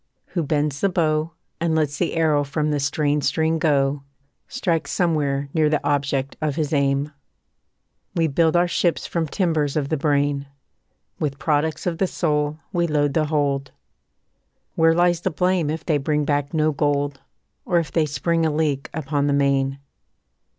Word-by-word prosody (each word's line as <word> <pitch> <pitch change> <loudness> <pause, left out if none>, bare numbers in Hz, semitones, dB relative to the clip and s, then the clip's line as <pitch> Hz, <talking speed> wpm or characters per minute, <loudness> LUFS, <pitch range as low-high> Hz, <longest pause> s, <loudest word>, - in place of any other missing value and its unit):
Who 175 - -1
bends 145 -2 -1
the 200 - +3
bow, 160 -2 0 0.3
And 165 -1 0
lets 150 -2 0
the 175 - 0
arrow 155 -3 +2
from 150 +2 -1
the 145 - 0
strained 145 +1 0
string 160 +3 +1
go, 140 -2 +1 0.5
Strikes 165 -6 -1
somewhere 145 -5 0
near 155 -2 +3
the 150 -1 0
object 140 -1 0
of 150 -3 -1
his 155 -1 -1
aim. 140 0 +1 1.0
We 165 -2 +2
build 160 +2 +2
our 175 +1 +4
ships 175 0 0
from 165 -2 -2
timbers 155 -4 0
of 145 -3 -1
the 155 - 0
brain; 145 -1 0 0.7
With 140 -2 -2
products 150 +1 0
of 170 -2 -2
the 190 - +2
soul 150 -3 -1 0.2
we 170 -1 +1
load 145 -2 +1
the 155 -2 +2
hold; 140 -3 -1 1.0
Where 165 0 +4
lies 175 0 +3
the - - 0
blame 180 0 +1
if 160 +1 -4
they 155 -4 +1
bring 150 +1 0
back 145 -1 0
no 155 -1 +2
gold, 145 -1 -1 0.4
Or 175 - +1
if 165 -3 -1
they 160 -2 +1
spring 165 +3 0
a 160 - +3
leak 150 -3 -1
upon 145 -1 -1
the 145 - +2
main? 140 -1 +1
150 Hz, 170 wpm, -22 LUFS, 140-160 Hz, 1.0 s, our